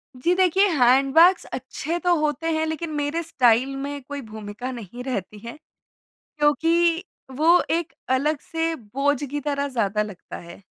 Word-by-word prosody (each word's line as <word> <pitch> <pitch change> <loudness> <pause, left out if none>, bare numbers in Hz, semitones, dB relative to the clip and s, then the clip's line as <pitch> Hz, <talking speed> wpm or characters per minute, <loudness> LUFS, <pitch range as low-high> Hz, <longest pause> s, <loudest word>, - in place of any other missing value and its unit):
जी, 335 +8 +1
देखिए 380 +2 +4
हैंडबैग्स 275 +9 +5
अच्छे 280 +6 -4
तो 355 0 +2
होते 300 +1 -1
हैं 315 - 0
लेकिन 315 +1 -4
मेरे 295 +3 -1
स्टाइल 255 -3 +2
में 285 +1 -5
कोई 285 +1 -6
भूमिका 215 +4 -7
नहीं 240 +1 -8
रहती 210 -5 -4
है, 240 - -8 0.8
क्योंकि 330 +4 +2 0.3
वो 335 +3 +5
एक 330 -4 -1 0.2
अलग 295 +2 0
से 325 0 -2
बोझ 275 +4 -1
की 290 +1 -3
तरह 280 0 0
ज़्यादा 210 -5 -1
लगता 205 -4 -9
है। 170 +3 -12
285 Hz, 150 wpm, -23 LUFS, 250-325 Hz, 0.8 s, हैंडबैग्स